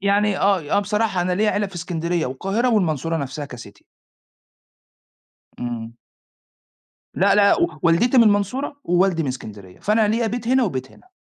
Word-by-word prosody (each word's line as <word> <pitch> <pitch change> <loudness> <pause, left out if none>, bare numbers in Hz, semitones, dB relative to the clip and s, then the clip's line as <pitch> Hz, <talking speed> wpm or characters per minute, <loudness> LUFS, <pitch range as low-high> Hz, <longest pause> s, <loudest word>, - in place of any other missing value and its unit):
يعني 200 0 +1
آه 195 -2 +2 0.2
آه - - +5
بصراحة 210 -2 -1
أنا 180 0 -1
ليَّ 210 +3 +1
عيلة 205 0 0
في 195 - -14
إسكندرية 170 -1 -2
والقاهرة 195 - -1
والمنصورة 165 -4 0
نفسها 140 0 -5
كCity. 120 -6 -12 1.8
امم. 115 -2 -5 1.2
لا، 200 +2 +3
لأ 205 - +4
و 340 - +4 0.2
والدتي 210 +10 +3
من 235 - +7
المنصورة 215 +8 0
ووالدي 180 -1 +2
من 140 - -3
إسكندرية، 105 -7 -8
فأنا 215 0 +2
ليَّ 225 +1 +1
بيت 235 +1 -4
هنا 260 +1 +3
وبيت 130 - -4
هنا. 370 - -22
190 Hz, 155 wpm, -21 LUFS, 155-210 Hz, 1.8 s, من